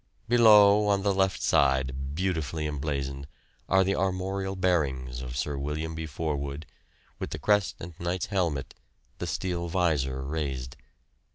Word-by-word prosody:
Below, 105 -3 +7
on 100 -1 +2
the 100 -1 +2
left 95 0 +1
side, 65 0 +1
beautifully 80 -4 -1
emblazoned, 70 -2 -3 0.4
are 95 0 +5
the 95 +1 +1
armorial 95 +1 -1
bearings 65 -9 0
of 65 -1 -6
Sir 70 +1 -2
William 75 +3 -3
B. 80 0 -5
Forwood, 75 -1 -3 0.5
with - - -4
the - - -4
crest 105 -2 +2
and 85 +1 -8
knight's 85 +1 -1
helmet, 85 -9 -1 0.5
the - - -3
steel 85 -2 -2
visor 75 -7 0
raised. 70 -4 -3
80 Hz, 135 wpm, -28 LUFS, 70-95 Hz, 0.5 s, Below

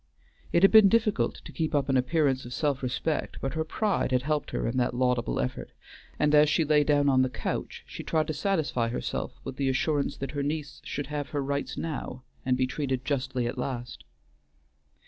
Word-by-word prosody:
It 170 - +3
had 195 - +8
been 220 -3 +8
difficult 220 -1 +1
to - - -9
keep 160 -1 -2
up 145 - +1
an 135 - +1
appearance 135 0 +2
of 120 - -8
self 145 -3 0
respect, 135 +5 -2
but 135 -1 -3
her 160 0 0
pride 200 0 0
had 125 0 +2
helped 150 +1 -1
her - - -2
in 120 +2 -2
that 125 -1 +1
laudable 125 -1 +1
effort, 125 -1 -3 0.4
and 150 0 +2
as 150 0 +6
she 155 +2 +2
lay 150 0 +4
down 145 -1 +3
on 130 -2 +4
the 130 - +2
couch - - -4
she - - -8
tried 155 -1 +1
to 155 - -3
satisfy 150 -8 0
herself 120 - -4
with 130 - -6
the 135 -1 +1
assurance 140 +2 0
that 135 -1 -4
her 145 - -2
niece 145 0 -3
should 145 - -4
have 145 -2 -3
her 145 -2 -2
rights 140 +1 -3
now, 135 -5 -4 0.2
and 125 0 +1
be 130 - +2
treated 130 -1 -2
justly 130 -3 -1
at 125 +2 -3
last. 125 -2 -5
140 Hz, 205 wpm, -28 LUFS, 130-155 Hz, 0.4 s, had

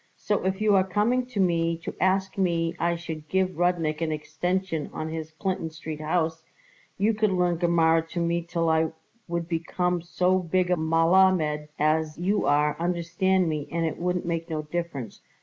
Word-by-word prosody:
So 210 - -1
if 190 +2 -1
you 215 -1 +4
are 190 - +5
coming 215 +7 +1
to 245 -5 -5
me 170 -2 +2
to - - -4
ask 190 +1 +1
me 170 -3 0
I 170 0 +1
should 160 -2 -7
give 190 -1 +1
Rudnik 170 -2 0
an 160 -1 0
extension 175 +2 -2
on 155 - -4
his 160 -1 -5
Clinton 180 +1 -3
Street 155 -1 -7
house, 160 0 0 0.6
you 210 +3 +2
could 215 0 +2
learn 180 -2 +1
Gemara 165 -1 +3
to 175 - -4
me 170 0 +1
till 170 0 -2
I 160 0 +2 0.3
would 170 -1 -2
become 175 +1 -1
so 180 +2 +1
big 180 +1 0
a - - +5
Melammed 165 -1 +3
as 155 +1 +1
you 190 +5 0
are, 150 +1 +3
understand 175 +2 +1
me, 150 -2 -2
and 170 0 0
it 160 - -3
wouldn't 180 0 -1
make 165 0 -2
no 155 -1 -2
difference. 150 -7 -5
170 Hz, 180 wpm, -26 LUFS, 160-185 Hz, 0.6 s, are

